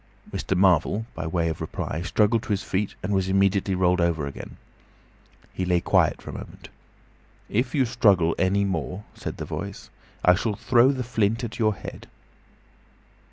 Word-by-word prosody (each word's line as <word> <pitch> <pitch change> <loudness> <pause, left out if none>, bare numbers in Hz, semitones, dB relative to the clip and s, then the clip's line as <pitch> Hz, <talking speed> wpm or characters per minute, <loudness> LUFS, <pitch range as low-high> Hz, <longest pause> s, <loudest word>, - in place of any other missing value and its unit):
Mr. 95 - -2
Marvel 95 +3 +3
by 80 -2 -5
way 85 0 0
of 80 -2 -3
reply 80 - -4
struggled 105 +5 +2
to - - -12
his 100 -1 0
feet, 100 +2 -2
and 100 +2 -1
was 95 -1 +1
immediately 95 0 +2
rolled 90 0 +2
over 85 -3 +1
again. 70 - -8 1.0
He 95 - -3
lay 90 -1 +2
quiet - - +2
for - - -7
a - - -12
moment. - - -10 0.8
"If 125 +5 0
you 135 -3 +3
struggle 95 -8 +3
any 100 +2 +2
more," 95 +1 -3
said - - -6
the - - -5
Voice, - - -6 0.3
"I 90 - +7
shall 105 +3 -1
throw 120 +5 +4
the 130 -2 -3
flint 115 0 0
at 115 0 -5
your 110 -2 +2
head." - - -9
95 Hz, 170 wpm, -25 LUFS, 90-110 Hz, 1.0 s, I